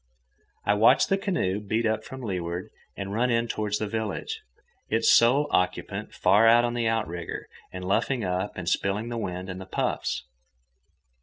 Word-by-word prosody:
I 105 Hz, -, +4 dB
watched 105 Hz, +2 st, +5 dB
the 195 Hz, -, +3 dB
canoe 140 Hz, -, 0 dB
beat 110 Hz, +2 st, -1 dB
up 110 Hz, 0 st, 0 dB
from 130 Hz, +2 st, -9 dB
leeward 90 Hz, -4 st, -3 dB, 0.3 s
and 100 Hz, 0 st, -4 dB
run 120 Hz, +4 st, +1 dB
in 115 Hz, 0 st, +1 dB
toward 105 Hz, -2 st, -2 dB
the 110 Hz, -, -2 dB
village, 110 Hz, -1 st, -3 dB, 0.5 s
its 110 Hz, +1 st, +3 dB
sole 130 Hz, +5 st, +5 dB
occupant 90 Hz, 0 st, -1 dB
far 100 Hz, +5 st, +4 dB
out 120 Hz, +1 st, +6 dB
on 120 Hz, -, -1 dB
the 120 Hz, -1 st, 0 dB
outrigger 85 Hz, -7 st, -3 dB, 0.2 s
and 90 Hz, 0 st, -6 dB
luffing 115 Hz, +6 st, +1 dB
up 95 Hz, +2 st, -1 dB
and 90 Hz, -2 st, -5 dB
spilling 100 Hz, +5 st, 0 dB
the 120 Hz, -1 st, -3 dB
wind 90 Hz, -3 st, -4 dB
in 90 Hz, -1 st, -6 dB
the 95 Hz, -, -9 dB
puffs. 65 Hz, -7 st, -2 dB
105 Hz, 170 wpm, -26 LUFS, 95-115 Hz, 0.5 s, out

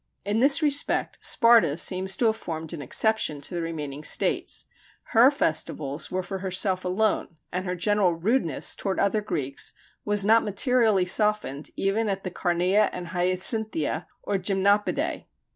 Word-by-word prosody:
In 205 Hz, +2 st, 0 dB
this 275 Hz, +5 st, +4 dB
respect 285 Hz, -1 st, 0 dB
Sparta 230 Hz, -10 st, +4 dB
seems 190 Hz, +2 st, 0 dB
to 240 Hz, -, +1 dB
have 220 Hz, -1 st, +3 dB
formed 160 Hz, -6 st, -6 dB
an 160 Hz, -, -6 dB
exception 160 Hz, -, +1 dB
to 145 Hz, -, -8 dB
the 175 Hz, -, -2 dB
remaining 150 Hz, -3 st, -5 dB
states. -, -, -1 dB, 0.5 s
Her 240 Hz, +3 st, +7 dB
festivals 155 Hz, -, -3 dB
were 185 Hz, 0 st, -2 dB
for 195 Hz, +1 st, -5 dB
herself 185 Hz, 0 st, -1 dB
alone, 185 Hz, -1 st, 0 dB, 0.2 s
and 180 Hz, +1 st, -3 dB
her 180 Hz, -, -2 dB
general 195 Hz, -1 st, +1 dB
rudeness 170 Hz, -, -1 dB
toward 195 Hz, -2 st, -3 dB
other 205 Hz, +2 st, +1 dB
Greeks 140 Hz, -10 st, -3 dB, 0.3 s
was 205 Hz, -1 st, 0 dB
not 225 Hz, +2 st, +5 dB
materially 215 Hz, -2 st, +2 dB
softened 210 Hz, -7 st, +1 dB
even 210 Hz, +3 st, 0 dB
at 195 Hz, -1 st, -3 dB
the 185 Hz, -, -4 dB
Carneia 180 Hz, +5 st, +1 dB
and 175 Hz, -1 st, -7 dB
Hyacinthia, 180 Hz, -1 st, -1 dB, 0.2 s
or 200 Hz, -1 st, -1 dB
Gymnopædiæ. 200 Hz, +2 st, 0 dB
190 Hz, 150 wpm, -25 LUFS, 175-215 Hz, 0.5 s, Her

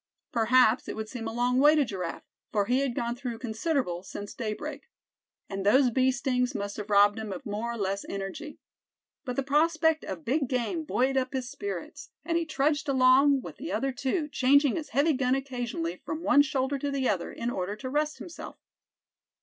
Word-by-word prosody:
Perhaps 235 Hz, 0 st, +4 dB
it -, -, -4 dB
would 220 Hz, 0 st, -4 dB
seem 230 Hz, -3 st, -5 dB
a -, -, -3 dB
long 245 Hz, +2 st, +1 dB
way 295 Hz, +3 st, +6 dB
to 295 Hz, -2 st, +3 dB
Giraffe, 185 Hz, -7 st, -5 dB, 0.3 s
for 205 Hz, -2 st, +1 dB
he 250 Hz, +5 st, +2 dB
had 270 Hz, -3 st, -1 dB
gone 235 Hz, 0 st, -1 dB
through 245 Hz, -2 st, -5 dB
considerable 225 Hz, -, -1 dB
since 200 Hz, +2 st, -8 dB
daybreak. 220 Hz, -, -5 dB, 0.6 s
And 195 Hz, -1 st, -4 dB
those 250 Hz, +5 st, +4 dB
bee 260 Hz, +2 st, +3 dB
stings 255 Hz, -1 st, -1 dB
must 200 Hz, 0 st, -4 dB
have 210 Hz, 0 st, -6 dB
robbed 205 Hz, +1 st, +5 dB
him 215 Hz, -2 st, -5 dB
of 185 Hz, -, -7 dB
more 215 Hz, +3 st, -3 dB
or -, -, -6 dB
less 200 Hz, -1 st, -2 dB
energy. 200 Hz, +11 st, -6 dB, 0.7 s
But 250 Hz, -2 st, -3 dB
the 275 Hz, -, 0 dB
prospect 315 Hz, +2 st, +2 dB
of 180 Hz, -4 st, -6 dB
big 275 Hz, +3 st, +1 dB
game 270 Hz, +6 st, -1 dB
buoyed 265 Hz, -1 st, +1 dB
up 260 Hz, +1 st, -1 dB
his 255 Hz, -2 st, -3 dB
spirits, 405 Hz, 0 st, -6 dB, 0.2 s
and 335 Hz, -, -1 dB
he 335 Hz, -1 st, 0 dB
trudged 295 Hz, 0 st, 0 dB
along 265 Hz, +1 st, +5 dB
with -, -, -9 dB
the 310 Hz, +5 st, -6 dB
other 270 Hz, 0 st, 0 dB
two, 275 Hz, +5 st, -1 dB
changing 280 Hz, 0 st, +3 dB
his 315 Hz, -3 st, -4 dB
heavy 285 Hz, +6 st, +2 dB
gun 255 Hz, -1 st, +1 dB
occasionally 240 Hz, -11 st, -4 dB
from 315 Hz, +2 st, -5 dB
one 285 Hz, -, +6 dB
shoulder 280 Hz, -1 st, -1 dB
to 285 Hz, -, -2 dB
the 275 Hz, -2 st, 0 dB
other, 185 Hz, -4 st, -1 dB
in 235 Hz, +1 st, -3 dB
order 190 Hz, -1 st, -3 dB
to 255 Hz, -, -7 dB
rest 300 Hz, +3 st, -1 dB
himself. 345 Hz, -, -9 dB
255 Hz, 200 wpm, -28 LUFS, 220-285 Hz, 0.7 s, way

